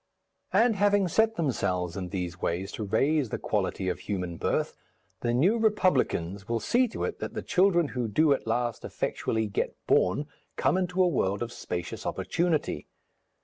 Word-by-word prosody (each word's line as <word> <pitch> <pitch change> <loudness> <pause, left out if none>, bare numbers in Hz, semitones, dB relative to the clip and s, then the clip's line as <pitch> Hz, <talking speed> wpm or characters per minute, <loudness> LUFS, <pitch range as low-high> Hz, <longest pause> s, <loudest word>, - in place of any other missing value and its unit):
And 225 -2 +4
having 205 -1 +3
set 220 +5 +2
themselves 90 - -1
in 90 -2 -4
these 90 -2 -4
ways 90 +3 -1
to 110 - -5
raise 135 +6 +1
the - - -2
quality 95 -2 -1
of 90 - -1
human 90 -4 -3
birth, - - -1 0.4
the 120 - 0
New 175 - +3
Republicans 115 - +1
will 115 0 +1
see 245 - +2
to 225 - -5
it - - -3
that - - -5
the - - -3
children 180 -5 +3
who 125 -2 -2
do 145 +8 +4
at 135 - -4
last 120 0 -1
effectually 110 0 -2
get 105 - -2
born 95 +11 +2 0.3
come - - +2
into 185 0 +1
a - - +4
world 100 - 0
of 120 - -6
spacious 90 -6 -5
opportunity. 160 - -1
120 Hz, 170 wpm, -28 LUFS, -, 0.4 s, And